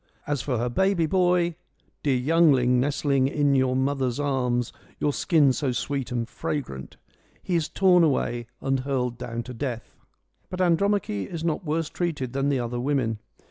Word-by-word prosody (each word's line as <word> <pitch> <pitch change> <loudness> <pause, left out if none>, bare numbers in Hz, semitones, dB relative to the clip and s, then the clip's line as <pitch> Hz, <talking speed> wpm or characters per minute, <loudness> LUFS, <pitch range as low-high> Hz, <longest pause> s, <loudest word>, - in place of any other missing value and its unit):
As 145 -3 -1
for 125 -2 -1
her 120 +2 0
baby 190 +6 +2
boy; 175 0 +2 0.3
' - - -40
dear 135 -3 +1
youngling 130 -3 +4
nestling 140 0 +1
in 145 0 +1
your 130 -1 +2
mother's 130 -1 0
arms, 125 -4 0 0.3
your 145 - +1
skin 150 -7 +3
so 135 0 -1
sweet 135 +2 -3
and 120 -2 -2
fragrant,' 95 - -5 0.5
he 180 - -3
is 160 -2 0
torn 180 -3 +4
away 120 -6 0
and 135 0 0
hurled 125 -3 -2
down 120 -1 -4
to 125 - -8
death. 120 -2 -5 0.6
But 185 - -6
Andromache 180 - +1
is 165 -2 -5
not 165 +2 -1
worse 160 0 -1
treated 150 -8 -3
than 135 +1 0
the 140 -2 +1
other 120 0 -3
women. 125 -5 0
135 Hz, 170 wpm, -25 LUFS, 125-160 Hz, 0.6 s, youngling